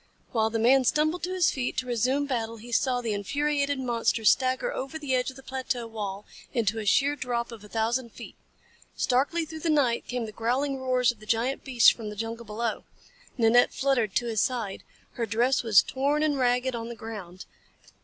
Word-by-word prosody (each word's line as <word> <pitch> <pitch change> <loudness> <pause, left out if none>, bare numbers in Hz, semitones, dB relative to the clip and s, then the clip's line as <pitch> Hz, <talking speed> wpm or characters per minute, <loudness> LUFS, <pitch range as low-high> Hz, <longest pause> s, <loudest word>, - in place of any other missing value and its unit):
While 220 -2 +1
the 225 - -2
man 255 +4 +5
stumbled 310 +6 +1
to 365 - -4
his 360 -3 +3
feet 255 -2 -3
to 255 - -1
resume 255 +4 0
battle 230 -4 -3
he 235 +2 -11
saw 250 +1 +1
the 225 -3 -2
infuriated 285 +6 -1
monster 235 -3 0
stagger 260 - +3
over 270 - -5
the 290 -4 -3
edge 250 0 +1
of 260 - -10
the 270 - -13
plateau 260 -2 -3
wall 210 -3 -5 0.3
into 225 -2 +1
a 210 - -5
sheer 280 +6 +3
drop 240 -3 -3
of 225 -3 -10
a 210 - -13
thousand 230 +2 -1
feet. - - -11 0.6
Starkly 290 +7 +1
through 315 +1 -8
the 330 - -2
night 270 -6 +2
came 245 -2 -3
the 215 - -7
growling 260 +5 -1
roars 255 -2 +2
of 235 - -16
the 215 - -14
giant 235 +5 0
beasts 250 -4 +6
from 220 -3 -6
the 210 - -7
jungles 225 +1 -5
below. 225 +1 -3 0.5
Nanette 235 +1 +4
fluttered 255 -7 +1
to 240 - +1
his 225 -3 0
side. 230 -6 -2 0.3
Her 230 -2 -3
dress 240 +5 +2
was 220 -4 +5
torn 285 +3 0
and 305 -1 +2
dragged 250 -1 +1
on 230 0 -5
the 235 - -6
ground. 200 -5 -8
245 Hz, 205 wpm, -27 LUFS, 225-270 Hz, 0.6 s, beasts